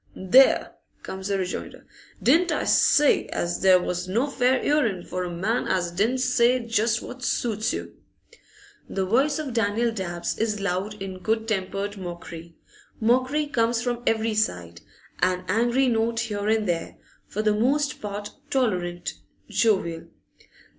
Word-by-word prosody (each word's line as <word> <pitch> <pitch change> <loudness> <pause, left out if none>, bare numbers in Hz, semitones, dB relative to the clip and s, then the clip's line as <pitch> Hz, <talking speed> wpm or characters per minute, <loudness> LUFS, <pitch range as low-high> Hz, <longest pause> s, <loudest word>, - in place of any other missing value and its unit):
'There!' 250 +9 +4 0.3
comes 190 0 -6
the 200 -1 0
rejoinder. 185 -1 -5 0.4
'Didn't 335 +7 +4
I 300 - 0
say 295 -1 +4
as 175 0 -3
there 185 -1 +6
was 180 0 -3
no 225 +8 +1
fair 260 -2 +1
'earing 230 -12 +1
for 185 0 -4
a 180 - -4
man 195 +8 -1
as 175 -2 0
didn't 215 +9 +1
say 250 -1 +3
just 230 -1 0
what 250 +1 -9
suits 220 -4 0
you?' - - -5 1.0
The 190 -1 -1
voice 270 +9 +2
of 295 -5 -4
Daniel 230 +1 +1
Dabbs 175 -5 -4
is 215 -1 0
loud 200 +2 -2
in 190 -1 -6
good 220 +3 -1
tempered 200 0 -2
mockery. 170 -2 -8 0.4
Mockery 255 +6 +2
comes 235 -4 0
from 240 -1 -2
every 225 0 +1
side, 85 - -2 0.4
an 185 0 +1
angry 240 +6 +2
note 230 -1 +1
here 210 -2 -3
and 220 -1 +1
there, 170 -2 -2 0.3
for 215 - -3
the 215 -1 +3
most 280 +7 0
part 205 0 -5 0.2
tolerant, 180 -10 -1 0.4
jovial. 190 -7 +1
215 Hz, 145 wpm, -25 LUFS, 185-240 Hz, 1.0 s, there